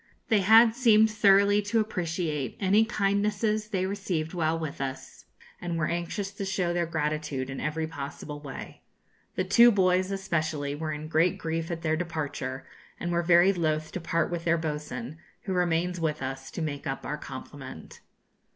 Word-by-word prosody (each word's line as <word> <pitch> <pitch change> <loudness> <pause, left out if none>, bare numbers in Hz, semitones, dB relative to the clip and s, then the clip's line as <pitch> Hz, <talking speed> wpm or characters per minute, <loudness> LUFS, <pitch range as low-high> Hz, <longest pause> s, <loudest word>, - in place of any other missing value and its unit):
They 220 - +4
had 220 +4 +7
seemed 220 -3 +5
thoroughly 205 -1 +5
to 210 +3 0
appreciate 165 - -2
any 205 +3 +4
kindnesses 210 0 0
they 190 -3 -1
received 190 -5 -3
while 165 -2 0
with 155 -4 -5
us, 135 0 -6 0.4
and 175 -1 -3
were 155 - +1
anxious 175 +4 -3
to 200 0 -6
show 185 -2 -1
their 175 -1 0
gratitude 150 -4 -2
in 135 - -5
every 160 +1 -1
possible 145 -1 -7
way. 140 -3 -8 0.5
The 185 - 0
two 235 +6 +7
boys, 185 -3 +2
especially, 155 -7 -2
were 155 +1 -3
in 150 +1 -5
great 165 +2 +2
grief 165 0 -3
at 165 -1 -4
their 155 -1 +1
departure, 150 -6 -4 0.3
and 175 - -3
were 170 0 +2
very 175 +3 +5
loth 155 -3 -1
to 185 - -5
part 165 +1 0
with 170 -1 -3
their 170 0 +2
boatswain, 150 -3 -5 0.2
who 190 - -3
remains 180 0 0
with 155 -4 -1
us 135 0 -5
to 165 - -4
make 145 -2 -4
up 135 0 -4
our 150 +1 -3
complement. 130 - -9
170 Hz, 170 wpm, -28 LUFS, 150-195 Hz, 0.5 s, had